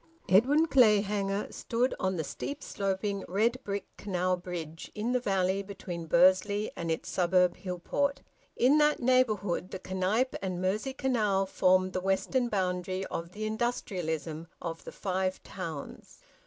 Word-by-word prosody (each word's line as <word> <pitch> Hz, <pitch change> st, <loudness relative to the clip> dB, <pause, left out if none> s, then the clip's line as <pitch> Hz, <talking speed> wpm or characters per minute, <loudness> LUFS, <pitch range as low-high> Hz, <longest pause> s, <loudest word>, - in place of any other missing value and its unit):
Edwin 270 Hz, -, +5 dB
Clayhanger 210 Hz, -7 st, +3 dB
stood 245 Hz, +3 st, 0 dB
on 190 Hz, -1 st, 0 dB
the 160 Hz, -, -1 dB
steep 285 Hz, -, -5 dB
sloping, 195 Hz, -1 st, -2 dB
red 225 Hz, +7 st, +1 dB
bricked 200 Hz, -1 st, -5 dB
canal 185 Hz, -2 st, 0 dB
bridge, 175 Hz, -3 st, -7 dB
in 220 Hz, +3 st, -1 dB
the 250 Hz, -, +2 dB
valley 195 Hz, -3 st, +1 dB
between 185 Hz, -4 st, -7 dB
Bursley 190 Hz, +5 st, +4 dB
and 170 Hz, -1 st, -4 dB
its 160 Hz, -, -2 dB
suburb 180 Hz, 0 st, +3 dB
Hillport. 200 Hz, +10 st, -2 dB, 0.3 s
In 275 Hz, +5 st, +4 dB
that 300 Hz, 0 st, +4 dB
neighbourhood 220 Hz, -8 st, +2 dB
the 185 Hz, 0 st, -7 dB
Knype 210 Hz, +8 st, +1 dB
and 185 Hz, -2 st, -3 dB
Mersey 210 Hz, +8 st, -1 dB
canal 215 Hz, -8 st, +1 dB
formed 185 Hz, 0 st, +2 dB
the 185 Hz, -, -1 dB
western 215 Hz, +6 st, +1 dB
boundary 185 Hz, -1 st, -1 dB
of 170 Hz, +1 st, -5 dB
the 215 Hz, +1 st, -4 dB
industrialism 175 Hz, -8 st, -2 dB
of 165 Hz, -1 st, -6 dB
the -, -, -7 dB
Five 185 Hz, -1 st, -2 dB
Towns. 165 Hz, -6 st, -7 dB
195 Hz, 140 wpm, -30 LUFS, 180-220 Hz, 0.3 s, Edwin